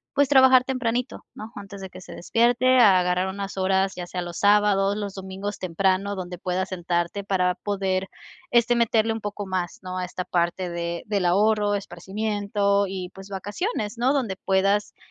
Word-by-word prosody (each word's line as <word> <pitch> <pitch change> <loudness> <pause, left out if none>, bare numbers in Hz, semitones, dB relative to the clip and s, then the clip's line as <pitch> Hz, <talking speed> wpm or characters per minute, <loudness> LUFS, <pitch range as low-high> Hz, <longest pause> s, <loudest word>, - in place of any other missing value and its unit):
pues, 285 0 +4
trabajar 260 -2 +6
tempranito, 250 -1 -2
¿no?, 215 +1 -8
antes 200 -1 -9
de 190 - -8
que - - -11
se - - -11
despierte, 240 +6 +3
agarrar 185 -4 +4
unas 195 0 -5
horas, 190 0 +1
ya 175 -1 -7
sea 180 -1 -4
los 175 -1 -7
sábados, 205 -1 +3
los 205 -2 -4
domingos 195 +1 -6
temprano, 190 +3 0
donde 180 -2 -6
puedas 185 +1 -2
sentarte 175 +1 -2
para 185 -2 +1
poder, 190 -1 -2 0.4
este, 240 0 +3
meterle 225 -1 +2
un 225 - -5
poco 205 0 -5
más, 185 -2 -3
¿no?, 185 0 -4
a 180 - -2
esta 180 0 -5
parte 175 +1 -1
de 170 0 -4
del 205 -3 -1
ahorro, 205 +2 +2
esparcimiento 200 +1 -1
y, 185 -1 -5
pues, 195 0 -11
vacaciones, 210 - -4
¿no?, 260 +3 +3
donde 230 -9 -1
puedas, 195 +2 +1
195 Hz, 170 wpm, -24 LUFS, 185-210 Hz, 0.4 s, trabajar